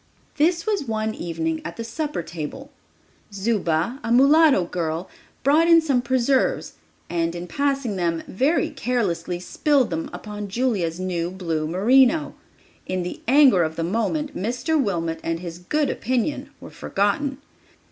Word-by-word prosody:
This 335 Hz, +3 st, +2 dB
was 410 Hz, -8 st, 0 dB
one 220 Hz, 0 st, -1 dB
evening 160 Hz, -3 st, -3 dB
at 170 Hz, -, -7 dB
the 230 Hz, -, -4 dB
supper 285 Hz, -, -3 dB
table. 170 Hz, -, -7 dB, 0.6 s
Zuba, 200 Hz, -, 0 dB
a 230 Hz, -, -2 dB
mulatto 275 Hz, -, +5 dB
girl, 170 Hz, 0 st, -3 dB, 0.4 s
brought 305 Hz, +5 st, +4 dB
in 335 Hz, -1 st, +7 dB
some 280 Hz, -6 st, +1 dB
preserves 260 Hz, +1 st, +1 dB, 0.3 s
and, 170 Hz, 0 st, -1 dB
in 175 Hz, 0 st, -5 dB
passing 275 Hz, 0 st, -1 dB
them, 170 Hz, -2 st, -1 dB
very 310 Hz, -, +1 dB
carelessly 200 Hz, -, -2 dB
spilled 270 Hz, -, +1 dB
them 165 Hz, 0 st, -3 dB
upon 210 Hz, -1 st, -6 dB
Julia's 195 Hz, -7 st, -1 dB
new 175 Hz, -2 st, -2 dB
blue 165 Hz, -4 st, -3 dB
merino. 255 Hz, -, +3 dB, 0.5 s
In 185 Hz, -1 st, -1 dB
the 180 Hz, -, -6 dB
anger 265 Hz, -7 st, +6 dB
of 160 Hz, -1 st, -1 dB
the 165 Hz, -, -2 dB
moment 230 Hz, -, -1 dB
Mr. 250 Hz, -, 0 dB
Wilmot 165 Hz, -6 st, -2 dB
and 165 Hz, 0 st, -2 dB
his 170 Hz, -1 st, -7 dB
good 285 Hz, +11 st, 0 dB
opinion 255 Hz, +4 st, -2 dB
were -, -, -11 dB
forgotten. 250 Hz, +8 st, -1 dB
215 Hz, 145 wpm, -23 LUFS, 175-275 Hz, 0.6 s, in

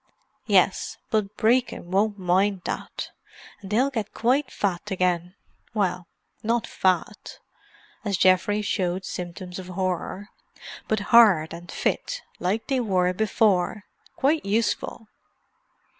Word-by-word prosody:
"Yes, -, -, +2 dB
but 210 Hz, -2 st, 0 dB
Brecon 235 Hz, -5 st, +1 dB
won't 205 Hz, +2 st, +2 dB
mind 190 Hz, +1 st, +1 dB
that. -, -, -5 dB, 0.5 s
And 195 Hz, -, -9 dB
they'll 250 Hz, +7 st, +2 dB
get 220 Hz, -5 st, -4 dB
quite 255 Hz, +4 st, +2 dB
fat 195 Hz, 0 st, -2 dB
again. 180 Hz, -1 st, 0 dB, 0.4 s
Well, 180 Hz, -4 st, 0 dB, 0.3 s
not 230 Hz, +1 st, 0 dB
fat—" 190 Hz, +1 st, -1 dB, 0.7 s
as 200 Hz, -4 st, 0 dB
Geoffrey 190 Hz, +3 st, +3 dB
showed 185 Hz, -3 st, -1 dB
symptoms 180 Hz, +1 st, -6 dB
of 185 Hz, -, -8 dB
horror—"but 190 Hz, +3 st, -4 dB
hard 195 Hz, -10 st, +6 dB
and 175 Hz, +1 st, -9 dB
fit, -, -, -2 dB, 0.2 s
like 200 Hz, +5 st, -1 dB
they 265 Hz, -2 st, 0 dB
were 185 Hz, -6 st, +1 dB
before. 210 Hz, -1 st, +1 dB, 0.3 s
Quite 300 Hz, +3 st, +2 dB
useful." 220 Hz, +2 st, -1 dB
200 Hz, 115 wpm, -25 LUFS, 180-220 Hz, 0.7 s, hard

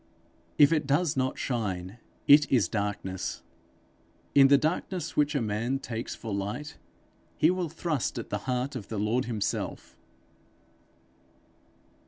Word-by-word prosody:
If 145 Hz, +2 st, +7 dB
it 150 Hz, -3 st, 0 dB
does 145 Hz, +3 st, +2 dB
not 130 Hz, -1 st, -1 dB
shine, 100 Hz, -4 st, -3 dB, 0.3 s
it 145 Hz, +1 st, +7 dB
is 115 Hz, -9 st, +4 dB
darkness. 100 Hz, -3 st, -3 dB, 0.9 s
In 135 Hz, -1 st, +7 dB
the 140 Hz, +1 st, +6 dB
darkness 170 Hz, +4 st, -2 dB
which 150 Hz, +1 st, +2 dB
a 140 Hz, -, +1 dB
man 110 Hz, +5 st, -1 dB
takes 120 Hz, -3 st, -5 dB
for 110 Hz, -3 st, -6 dB
light, 105 Hz, +10 st, -4 dB, 0.6 s
he 160 Hz, -, +4 dB
will 180 Hz, -2 st, -2 dB
thrust 160 Hz, -6 st, -2 dB
at 115 Hz, -, -6 dB
the 105 Hz, -, -1 dB
heart 125 Hz, +2 st, -1 dB
of 110 Hz, -7 st, -6 dB
the 110 Hz, -, -5 dB
Lord 110 Hz, +5 st, 0 dB
himself. 110 Hz, -4 st, -3 dB
125 Hz, 135 wpm, -28 LUFS, 105-145 Hz, 0.9 s, If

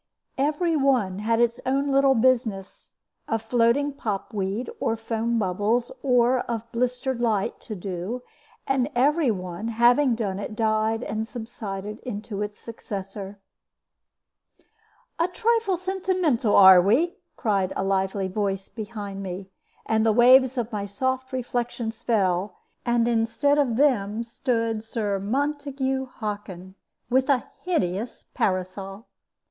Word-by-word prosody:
Every 310 Hz, +4 st, +1 dB
one 250 Hz, -10 st, +2 dB
had 225 Hz, +2 st, +1 dB
its 235 Hz, 0 st, +2 dB
own 275 Hz, +2 st, 0 dB
little 275 Hz, 0 st, +4 dB
business, 230 Hz, -5 st, 0 dB, 0.3 s
of 225 Hz, -1 st, -1 dB
floating 240 Hz, +5 st, +2 dB
pop 215 Hz, -5 st, -4 dB
weed 200 Hz, +4 st, -2 dB
or 225 Hz, -, 0 dB
foam 225 Hz, +1 st, -1 dB
bubbles 210 Hz, +4 st, 0 dB
or 250 Hz, -1 st, +3 dB
of 230 Hz, -2 st, -3 dB
blistered 250 Hz, +1 st, -1 dB
light, 215 Hz, -5 st, 0 dB
to 215 Hz, -, -7 dB
do; 190 Hz, +6 st, -5 dB, 0.4 s
and 270 Hz, -1 st, +1 dB
every 290 Hz, +3 st, +3 dB
one, 185 Hz, 0 st, -3 dB
having 240 Hz, +3 st, +4 dB
done 200 Hz, -4 st, -2 dB
it, 210 Hz, +1 st, -5 dB
died 220 Hz, +1 st, +1 dB
and 220 Hz, +1 st, -3 dB
subsided 215 Hz, -3 st, -6 dB
into 210 Hz, -3 st, -5 dB
its 210 Hz, 0 st, -4 dB
successor. 200 Hz, -3 st, -7 dB, 1.8 s
"A 335 Hz, -, +3 dB
trifle 450 Hz, 0 st, +1 dB
sentimental, 365 Hz, -, 0 dB
are 190 Hz, -2 st, +9 dB
we?" 255 Hz, -, +2 dB, 0.2 s
cried 195 Hz, -6 st, 0 dB
a -, -, -1 dB
lively 195 Hz, 0 st, 0 dB
voice 195 Hz, 0 st, -2 dB
behind 205 Hz, -3 st, -6 dB
me, 190 Hz, 0 st, -6 dB, 0.3 s
and 220 Hz, 0 st, +2 dB
the 225 Hz, -, +4 dB
waves 255 Hz, +3 st, +6 dB
of 240 Hz, -1 st, -2 dB
my 205 Hz, -2 st, -3 dB
soft 260 Hz, +5 st, -2 dB
reflections 240 Hz, -2 st, -3 dB
fell, 195 Hz, -4 st, 0 dB, 0.3 s
and 235 Hz, -1 st, +2 dB
instead 240 Hz, +6 st, +2 dB
of 255 Hz, -6 st, +2 dB
them 230 Hz, -5 st, +2 dB
stood 230 Hz, -2 st, -1 dB
Sir 210 Hz, -3 st, -2 dB
Montague 270 Hz, +3 st, -1 dB
Hockin, 205 Hz, -6 st, -6 dB, 0.3 s
with 260 Hz, +3 st, +2 dB
a 265 Hz, -3 st, +2 dB, 0.2 s
hideous 215 Hz, -, -1 dB
parasol. 190 Hz, +3 st, -2 dB
230 Hz, 130 wpm, -25 LUFS, 200-260 Hz, 1.8 s, are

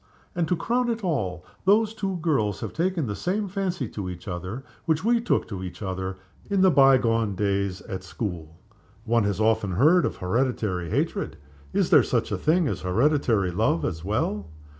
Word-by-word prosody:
And, 170 Hz, -2 st, 0 dB
to 180 Hz, -, +2 dB
crown 240 Hz, +7 st, 0 dB
it 230 Hz, -2 st, -2 dB
all, 95 Hz, -, -2 dB, 0.2 s
those 215 Hz, +3 st, +4 dB
two 195 Hz, -4 st, -3 dB
girls 110 Hz, -, +1 dB
have -, -, -5 dB
taken 175 Hz, -2 st, 0 dB
the 105 Hz, -3 st, -3 dB
same 200 Hz, -, -1 dB
fancy 185 Hz, -, -2 dB
to 95 Hz, -3 st, -5 dB
each 90 Hz, -1 st, -9 dB
other 90 Hz, +7 st, -5 dB, 0.2 s
which 160 Hz, 0 st, +1 dB
we 235 Hz, +1 st, +3 dB
took 240 Hz, -, 0 dB
to 100 Hz, -4 st, -5 dB
each 90 Hz, +3 st, -7 dB
other 95 Hz, 0 st, -3 dB, 0.3 s
in 200 Hz, -2 st, +2 dB
the 190 Hz, -1 st, +6 dB
by 135 Hz, -3 st, +6 dB
gone 115 Hz, -4 st, 0 dB
days 100 Hz, -1 st, -1 dB
at 95 Hz, -5 st, -6 dB
school. 85 Hz, -5 st, -5 dB, 0.5 s
One 115 Hz, -1 st, +2 dB
has 100 Hz, 0 st, -1 dB
often 110 Hz, -3 st, +2 dB
heard 155 Hz, -, +5 dB
of -, -, -2 dB
hereditary 100 Hz, -4 st, -1 dB
hatred. -, -, -1 dB, 0.3 s
Is -, -, +1 dB
there -, -, +8 dB
such -, -, -1 dB
a -, -, 0 dB
thing 165 Hz, +1 st, +2 dB
as -, -, -3 dB
hereditary 110 Hz, -, +2 dB
love 85 Hz, -1 st, +1 dB
as 80 Hz, -2 st, -3 dB
well?" 105 Hz, -1 st, -1 dB
115 Hz, 185 wpm, -25 LUFS, -, 0.5 s, there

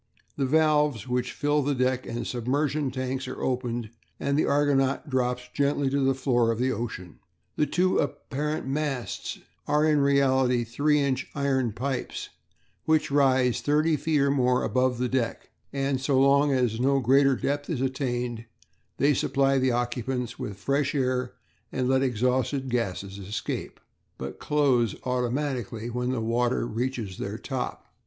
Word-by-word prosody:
The 135 Hz, -2 st, 0 dB
valves 150 Hz, -5 st, +2 dB
which 125 Hz, 0 st, -1 dB
fill 145 Hz, 0 st, +1 dB
the 145 Hz, 0 st, 0 dB
deck 130 Hz, 0 st, 0 dB
and 120 Hz, -, -4 dB
submersion 140 Hz, +4 st, -1 dB
tanks 130 Hz, 0 st, -3 dB
are 130 Hz, -, -6 dB
opened, 120 Hz, -3 st, -2 dB, 0.3 s
and 140 Hz, +1 st, 0 dB
the 150 Hz, -, +2 dB
Argonaut 140 Hz, -1 st, +2 dB
drops 125 Hz, -1 st, 0 dB
gently 140 Hz, -1 st, +1 dB
to 140 Hz, -, +1 dB
the 135 Hz, 0 st, +2 dB
floor 120 Hz, -3 st, +2 dB
of 115 Hz, -, -2 dB
the 130 Hz, +2 st, +1 dB
ocean. 100 Hz, -7 st, -5 dB, 0.4 s
The 150 Hz, -, +1 dB
two 180 Hz, +5 st, +2 dB
apparent 150 Hz, +2 st, -2 dB
masts 135 Hz, -6 st, -3 dB, 0.3 s
are 150 Hz, +1 st, +3 dB
in 155 Hz, -1 st, +3 dB
reality 135 Hz, -3 st, +3 dB
3 145 Hz, +6 st, +1 dB
inch 135 Hz, -2 st, 0 dB
iron 135 Hz, -4 st, +1 dB
pipes 130 Hz, +4 st, -4 dB, 0.6 s
which 155 Hz, -2 st, +2 dB
rise 130 Hz, -3 st, +3 dB
thirty 155 Hz, +2 st, +2 dB
feet 150 Hz, 0 st, +1 dB
or 140 Hz, 0 st, +3 dB
more 125 Hz, -2 st, +2 dB
above 125 Hz, +3 st, +1 dB
the 125 Hz, +1 st, 0 dB
deck, 125 Hz, -2 st, -2 dB, 0.2 s
and 135 Hz, -1 st, -1 dB
so 135 Hz, -1 st, +2 dB
long 140 Hz, +1 st, +4 dB
as 125 Hz, -4 st, +1 dB
no 135 Hz, +2 st, +3 dB
greater 135 Hz, +2 st, +4 dB
depth 145 Hz, +3 st, -2 dB
is 160 Hz, -7 st, -1 dB
attained, 125 Hz, -3 st, -2 dB, 0.5 s
they 145 Hz, +2 st, +4 dB
supply 135 Hz, -1 st, +2 dB
the 130 Hz, 0 st, +2 dB
occupants 120 Hz, 0 st, -2 dB
with 100 Hz, -2 st, -5 dB
fresh 140 Hz, +6 st, 0 dB
air 130 Hz, -2 st, 0 dB, 0.4 s
and 130 Hz, -1 st, -1 dB
let 130 Hz, 0 st, +3 dB
exhausted 130 Hz, +2 st, 0 dB
gases 100 Hz, -4 st, -2 dB
escape, 100 Hz, +3 st, -5 dB, 0.4 s
but -, -, -6 dB
close 130 Hz, -7 st, +2 dB
automatically 125 Hz, -2 st, -2 dB
when 125 Hz, +1 st, -2 dB
the 130 Hz, -3 st, -1 dB
water 120 Hz, +2 st, +1 dB
reaches 115 Hz, -4 st, -3 dB
their -, -, -4 dB
top. -, -, -5 dB
130 Hz, 155 wpm, -26 LUFS, 125-140 Hz, 0.6 s, long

